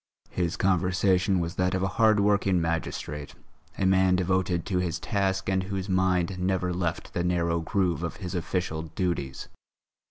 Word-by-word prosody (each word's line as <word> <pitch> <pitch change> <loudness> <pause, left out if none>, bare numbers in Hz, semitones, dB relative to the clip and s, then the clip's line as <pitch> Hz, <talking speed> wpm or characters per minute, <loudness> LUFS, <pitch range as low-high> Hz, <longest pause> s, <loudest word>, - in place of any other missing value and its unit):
His 85 -1 -1
conversation 95 0 +2
was 85 0 -2
that 90 0 +1
of 95 - -1
a - - +2
hard 110 -2 +5
working 100 -2 +3
magistrate, 75 -3 -3 0.4
a 95 - 0
man 95 0 +4
devoted 90 -1 0
to 95 -3 0
his 90 -2 -1
task 95 0 -1
and 95 0 +1
whose 95 0 -4
mind 95 -1 +1
never 90 -1 0
left 85 -2 -3
the 85 - -1
narrow 85 -1 +1
groove 90 0 0
of 85 - -3
his 90 -3 -6
official 90 -2 -2
duties. 80 -5 -3
90 Hz, 160 wpm, -27 LUFS, 85-95 Hz, 0.4 s, hard